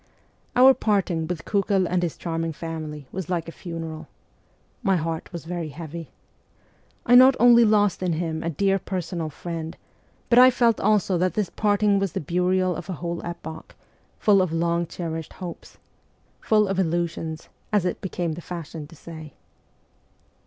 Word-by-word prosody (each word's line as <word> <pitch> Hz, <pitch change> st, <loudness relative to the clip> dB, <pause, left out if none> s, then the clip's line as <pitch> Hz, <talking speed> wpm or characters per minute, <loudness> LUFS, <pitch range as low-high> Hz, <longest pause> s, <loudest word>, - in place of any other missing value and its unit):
Our 260 Hz, +2 st, +8 dB
parting 195 Hz, -9 st, 0 dB
with 175 Hz, -2 st, -4 dB
Kiikel 200 Hz, -2 st, +1 dB
and 180 Hz, +1 st, 0 dB
his 175 Hz, -3 st, -2 dB
charming 165 Hz, -1 st, -3 dB
family 155 Hz, -2 st, -6 dB
was 185 Hz, -3 st, -5 dB
like 170 Hz, -3 st, -1 dB
a -, -, -6 dB
funeral. 165 Hz, -2 st, -7 dB, 0.7 s
My 195 Hz, -5 st, +2 dB
heart 165 Hz, -1 st, -3 dB
was 170 Hz, -3 st, -7 dB
very 170 Hz, -2 st, -4 dB
heavy. 165 Hz, +1 st, -8 dB, 1.0 s
I 245 Hz, -, +3 dB
not 255 Hz, +2 st, +8 dB
only 235 Hz, 0 st, +7 dB
lost 205 Hz, -4 st, +3 dB
in 180 Hz, -2 st, 0 dB
him 160 Hz, -1 st, -2 dB
a 165 Hz, -, -2 dB
dear 195 Hz, +5 st, +1 dB
personal 175 Hz, -4 st, -4 dB
friend, 165 Hz, +1 st, -6 dB, 0.5 s
but 240 Hz, -, +5 dB
I 255 Hz, +1 st, +9 dB
felt 235 Hz, -3 st, +2 dB
also 200 Hz, -4 st, +2 dB
that 185 Hz, +1 st, +1 dB
this 210 Hz, -5 st, -1 dB
parting 205 Hz, -1 st, +2 dB
was 195 Hz, -4 st, -1 dB
the -, -, -1 dB
burial 180 Hz, +3 st, +1 dB
of 175 Hz, +2 st, -8 dB
a -, -, -2 dB
whole 170 Hz, +1 st, -4 dB
epoch, 165 Hz, -2 st, -8 dB, 0.4 s
full 200 Hz, -2 st, +4 dB
of 185 Hz, -3 st, 0 dB
long 170 Hz, +1 st, 0 dB
cherished 165 Hz, -2 st, -5 dB
hopes 180 Hz, -3 st, -9 dB, 0.3 s
' -, -, -39 dB
full 215 Hz, -1 st, +5 dB
of 195 Hz, -1 st, -1 dB
illusions,' 165 Hz, -2 st, -2 dB, 0.2 s
as 205 Hz, -4 st, +2 dB
it 180 Hz, -, -2 dB
became 175 Hz, -3 st, -2 dB
the 165 Hz, +3 st, -6 dB
fashion 165 Hz, -3 st, -7 dB
to 165 Hz, -, -15 dB
say. 160 Hz, -2 st, -10 dB
175 Hz, 165 wpm, -24 LUFS, 165-195 Hz, 1.0 s, I